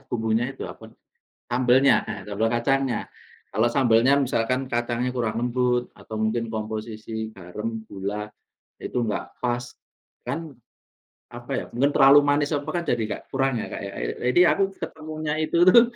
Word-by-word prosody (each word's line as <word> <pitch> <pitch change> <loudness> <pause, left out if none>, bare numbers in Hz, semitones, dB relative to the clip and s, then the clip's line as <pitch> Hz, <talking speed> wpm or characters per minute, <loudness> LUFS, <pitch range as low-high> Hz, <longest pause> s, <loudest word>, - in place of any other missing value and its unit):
bumbunya 115 0 0
itu - - -9
apa, - - -11 0.6
sambelnya, 125 +2 +5
heeh, 100 - -5
sambel 110 +2 0
kacangnya. 130 +1 +1 0.5
Kalau 110 +3 +3
sambelnya 120 0 +4
misalkan 125 0 +1
kacangnya 120 +1 0
kurang 115 -3 -1
lembut 125 0 0
atau 110 - -10
mungkin 115 +1 0
komposisi 110 0 -5
garam, 105 +5 -5
gula, 100 +2 -4 0.6
itu - - -5
enggak 105 - -2 0.2
pas, 120 0 0 0.6
kan, 165 -1 -3 0.8
apa - - -10
ya, - - -1
mungkin 140 +4 +3
terlalu 140 +1 +8
manis 145 0 +2
apa 145 - -4
kan 175 - 0
jadi 120 -5 +1
nggak - - -5
kurang 135 -1 +1
ya, - - -4
Kak, - - -5
ya. 100 0 -6
Iya, - - -2 0.2
jadi 175 - +4
aku 200 - 0 0.2
ketemunya 155 -1 -4
itu 170 +2 +2
tuh 235 +5 +9
120 Hz, 155 wpm, -24 LUFS, 110-135 Hz, 0.8 s, tuh